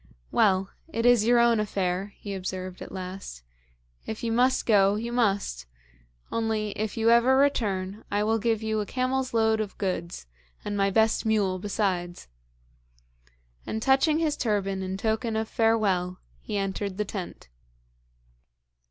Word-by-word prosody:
'Well, 190 -1 +2 0.2
it 230 -5 -1
is 245 -3 +5
your 240 0 +5
own 235 -1 +4
affair,' 195 -1 -2
he 200 - -6
observed 185 -1 -5
at - - -8
last. 185 - -7 0.6
'If 220 - -5
you 230 - 0
must 250 +3 +2
go, 200 -2 +4
you 230 +3 -4
must. 200 - 0 0.6
Only, 220 -2 -1
if 215 +2 -4
you 225 +1 +4
ever 240 +3 +5
return, 210 -8 0
I 205 +1 0
will 225 +1 +1
give 225 0 0
you 220 0 0
a 210 - -1
camel's 260 0 -1
load 220 -1 +2
of 210 -2 -4
goods 180 - -3 0.4
and 205 - -2
my 200 0 +2
best 220 +3 +2
mule 205 -4 +1
besides.' 185 -3 -2 1.4
And 220 - -2
touching 270 +6 +3
his 315 -2 0
turban 195 -4 -1
in 190 0 -3
token 220 +2 -1
of 220 0 -1
farewell, 200 -6 +1 0.2
he 210 - -4
entered 195 0 -3
the 210 - -1
tent. 185 - -7
210 Hz, 150 wpm, -26 LUFS, 190-230 Hz, 1.4 s, is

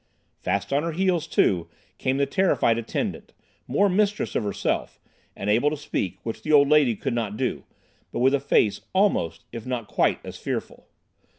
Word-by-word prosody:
Fast 100 +7 -1
on 140 - +3
her 165 +1 -3
heels, 175 -2 +1
too, 90 - +2 0.3
came 130 +1 0
the 140 - +2
terrified 140 -10 +2
attendant, 115 - -4 0.3
more 205 - +3
mistress 205 +2 +1
of - - +1
herself, 100 - -2 0.4
and 100 - -5
able 115 +8 +3
to 155 - -4
speak—which 110 -5 -4
the 155 - -2
old 145 -2 +6
lady 150 -6 +4
could 135 +4 -3
not 110 -3 -2
do—but 125 - -6
with 130 +3 +4
a 140 - +3
face 115 -6 +2
almost, 190 - +1
if 115 -2 -6
not 125 -3 -4
quite, - - +1
as - - -7
fearful. - - -5
130 Hz, 170 wpm, -25 LUFS, 110-155 Hz, 0.4 s, old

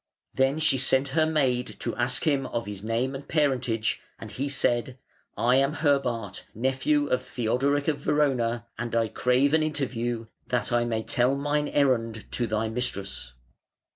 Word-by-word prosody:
Then 135 +2 +2
she 155 -4 +2
sent 130 +2 +3
her 155 +3 +2
maid 130 -6 +1
to - - -2
ask 125 +1 +1
him 140 -5 +1
of 115 - -3
his 100 -1 -7
name 115 +4 -1
and 135 +1 -7
parentage, 125 -7 0 0.2
and - - -9
he 140 +2 -3
said: 125 -2 +1 0.4
"I 125 +2 +3
am 135 +2 +2
Herbart, 125 - 0
nephew 135 +5 +1
of 125 - +1
Theodoric 130 +4 0
of 150 -2 +1
Verona, 120 -6 +1
and 120 0 -3
I 115 -1 +2
crave 125 +6 +2
an 160 - +4
interview, 120 -6 -2 0.2
that 125 -3 -1
I 120 0 +2
may 110 -1 -1
tell 125 +4 +1
mine 145 +1 0
errand 115 -6 +1
to 120 - -1
thy 110 +1 0
mistress". 100 - -4
125 Hz, 165 wpm, -26 LUFS, 115-140 Hz, 0.4 s, an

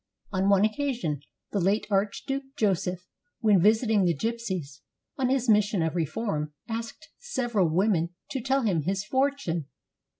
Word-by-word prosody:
On 190 0 +1
one 200 0 +5
occa 265 +5 +1
sion 150 - -3 0.3
the 205 - 0
late 195 +4 +2
Archduke 270 +8 -1
Joseph, 185 -3 0 0.4
v^^hen 205 -5 +5
visiting 220 +1 +4
the 170 -4 +2
gypsies 190 -10 -3 0.4
on 260 -2 0
his 260 -1 +1
mission 210 -4 +3
of 160 +1 -1
reform, 155 -2 -2
asked 230 0 -6
several 240 - 0
women 175 0 +2 0.2
to 265 - -2
tell 270 +2 +1
him 185 -8 +2
his 195 +5 -1
fortune. 260 - 0
205 Hz, 145 wpm, -27 LUFS, 175-235 Hz, 0.4 s, one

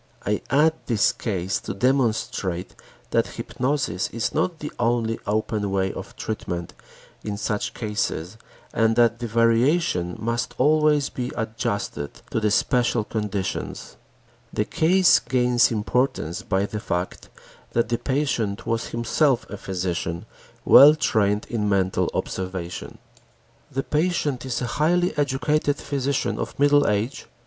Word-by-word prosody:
I 105 +1 0
add 150 +3 +4
this 110 -5 +3
case 95 -3 -2
to - - -6
demonstrate 110 -7 0 0.4
that - - +2
hypnosis 125 -9 -1
is 115 -2 -2
not 170 +2 0
the 150 -1 -6
only 115 -1 +1
open 105 -1 -1
way 95 -1 0
of - - -8
treatment 85 -6 -4 0.5
in 105 -1 -4
such 105 0 -2
cases 105 -4 -2 0.4
and 115 0 +2
that 120 0 +3
the 120 - -3
variations 115 - +2
must 115 +2 -2
always 150 0 +3
be 125 0 -4
adjusted 110 -9 -3
to - - +1
the 110 -1 +1
special 120 +1 +2
conditions. 105 -3 -4 0.6
The - - -1
case 180 +3 +4
gains 125 -1 +3
importance 110 -5 -1
by 95 +1 0
the 105 +1 -5
fact 90 -4 -4 0.4
that 115 0 +1
the 120 - 0
patient 130 -7 -1
was 115 0 -1
himself 120 +3 +1
a - - -4
physician 90 -3 -3 0.4
well 150 +3 +9
trained 105 -8 +1
in 105 -3 -1
mental 95 -2 +1
observation. 90 -2 -4 0.7
The 135 +1 -2
patient 150 -5 0
is 125 -1 -2
a 125 - -3
highly 175 +3 +2
educated 145 +1 +1
physician 140 0 -1
of - - -4
middle 145 0 +4
age. 105 +6 -1
115 Hz, 130 wpm, -24 LUFS, 100-135 Hz, 0.7 s, well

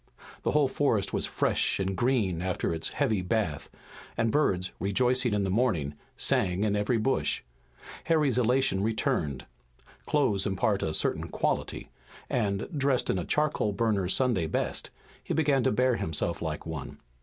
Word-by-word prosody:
The - - 0
whole 150 -2 +4
forest 130 -7 0
was - - +1
fresh - - 0
and 95 0 -1
green 110 -8 +1
after 90 -2 -1
its 80 - -2
heavy 110 -9 0
bath, 90 -5 -1 0.5
and 115 -1 +1
birds, 95 -11 +1
rejoicing 125 +5 +2
in 105 -1 +1
the 95 - -1
morning, 95 - +1 0.2
sang 95 +1 +1
in 105 -1 +1
every 105 +4 +1
bush. 130 +5 0 0.6
Harry's 150 -6 +2
elation 125 -4 +2
returned. 90 -10 -1 0.6
Clothes 120 -10 +2
impart 100 +1 0
a 80 - 0
certain - - -1
quality, - - -2 0.4
and, 100 -5 0
dressed 135 -2 +1
in 95 - -1
a 85 - -3
charcoal 150 -8 +1
burner's 100 -3 +1
Sunday 120 -11 +1
best, - - -2 0.3
he - - -2
began 145 -4 +3
to - - +3
bear 125 +2 +2
himself 80 +2 -2
like 80 -2 -4
one. 80 -4 -6
105 Hz, 155 wpm, -28 LUFS, 95-130 Hz, 0.6 s, whole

